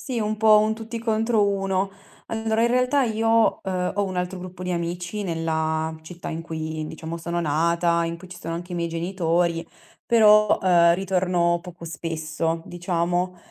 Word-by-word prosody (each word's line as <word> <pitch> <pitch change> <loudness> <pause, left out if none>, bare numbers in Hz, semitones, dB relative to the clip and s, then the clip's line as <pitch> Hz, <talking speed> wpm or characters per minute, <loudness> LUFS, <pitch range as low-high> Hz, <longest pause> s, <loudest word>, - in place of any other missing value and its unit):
Sì, 250 -5 -3
un 215 0 -1
po' 215 -1 +6
un 215 +1 +1
tutti 225 +1 -6
contro 225 -1 +2
uno. 195 -1 0 0.4
Allora 220 0 0
in 235 - +4
realtà 250 +3 +2
io, 225 0 +2
uhm, 185 -2 -1
ho 205 - +2
un 185 -1 -4
altro 180 +1 -2
gruppo 185 0 -9
di 180 - -3
amici 175 +4 -3
nella 160 -1 -1
città 175 +2 -8
in 165 0 -4
cui 160 -1 -4
diciamo 160 +1 -6
sono 170 +1 -3
nata, 170 +2 +1
in 165 0 -3
cui 185 +1 -13
ci 180 0 -10
sono 165 -2 -5
anche 175 +1 -6
i - - -2
miei 170 0 -1
genitori, 170 -1 0 0.4
però, 215 -2 +6
ehm, 170 -2 +5
ritorno 180 -2 +1
poco 175 -1 -11
spesso, 165 +1 -3
diciamo, 175 +1 -1
180 Hz, 175 wpm, -24 LUFS, 170-210 Hz, 0.4 s, po